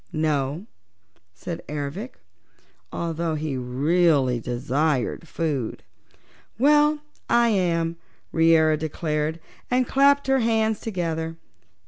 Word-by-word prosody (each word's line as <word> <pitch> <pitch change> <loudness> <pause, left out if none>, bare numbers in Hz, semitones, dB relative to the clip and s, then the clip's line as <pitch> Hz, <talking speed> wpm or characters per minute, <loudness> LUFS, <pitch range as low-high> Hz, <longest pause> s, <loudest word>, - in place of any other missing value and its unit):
"No," 155 +2 -1 0.7
said 170 - -6
Ervic, 150 - -5 0.8
although 165 -1 -2
he 150 -2 -3
really 135 +1 +2
desired 130 +5 -1
food. 150 -8 -3 0.7
"Well, 295 +3 +4 0.3
I 235 0 +4
am," 170 -5 0 0.3
Reera 160 -1 +4
declared 155 0 -2 0.3
and 250 0 +2
clapped 280 +1 +4
her 270 0 +3
hands 220 -2 +1
together. 165 -5 -3
165 Hz, 90 wpm, -24 LUFS, 150-215 Hz, 0.8 s, Well